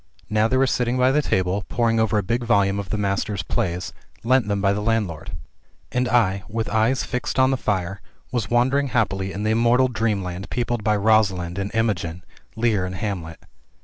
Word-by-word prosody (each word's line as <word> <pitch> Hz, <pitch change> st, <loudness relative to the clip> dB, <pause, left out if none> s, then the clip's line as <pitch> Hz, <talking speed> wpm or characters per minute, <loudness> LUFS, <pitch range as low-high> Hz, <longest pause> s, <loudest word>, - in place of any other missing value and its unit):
Now 110 Hz, +1 st, +3 dB
they 130 Hz, -, +1 dB
were 135 Hz, -, +4 dB
sitting 125 Hz, -1 st, 0 dB
by 130 Hz, +1 st, +4 dB
the 150 Hz, +2 st, +3 dB
table, 95 Hz, -5 st, 0 dB
poring 115 Hz, -1 st, +1 dB
over 110 Hz, -1 st, +2 dB
a 105 Hz, -, +1 dB
big 120 Hz, +5 st, -1 dB
volume 100 Hz, -4 st, +2 dB
of 100 Hz, -2 st, -6 dB
the 105 Hz, -, -1 dB
Master's 100 Hz, -1 st, -1 dB
plays, 90 Hz, 0 st, -2 dB, 0.3 s
lent 125 Hz, -1 st, +3 dB
them 100 Hz, -1 st, 0 dB
by 100 Hz, 0 st, +2 dB
the 105 Hz, -, -2 dB
landlord. 105 Hz, -8 st, -2 dB, 0.6 s
And 125 Hz, 0 st, 0 dB
I, 100 Hz, -5 st, +2 dB
with 115 Hz, +1 st, -2 dB
eyes 115 Hz, +4 st, +2 dB
fixed 125 Hz, +1 st, -3 dB
on 130 Hz, 0 st, +4 dB
the -, -, +2 dB
fire, 95 Hz, -5 st, -2 dB, 0.3 s
was 120 Hz, -7 st, -2 dB
wandering 130 Hz, +4 st, +2 dB
happily 100 Hz, -6 st, 0 dB
in 100 Hz, +2 st, -4 dB
the 110 Hz, -, +1 dB
immortal 120 Hz, +3 st, +3 dB
dreamland 100 Hz, -5 st, -2 dB
peopled 120 Hz, -2 st, -2 dB
by 105 Hz, 0 st, +2 dB
Rosalind 100 Hz, -4 st, +2 dB
and 100 Hz, 0 st, -2 dB
Imogen, 90 Hz, -6 st, -1 dB, 0.3 s
Lear 110 Hz, -4 st, +1 dB
and 90 Hz, 0 st, -4 dB
Hamlet. 90 Hz, -5 st, -5 dB
110 Hz, 190 wpm, -23 LUFS, 95-120 Hz, 0.6 s, were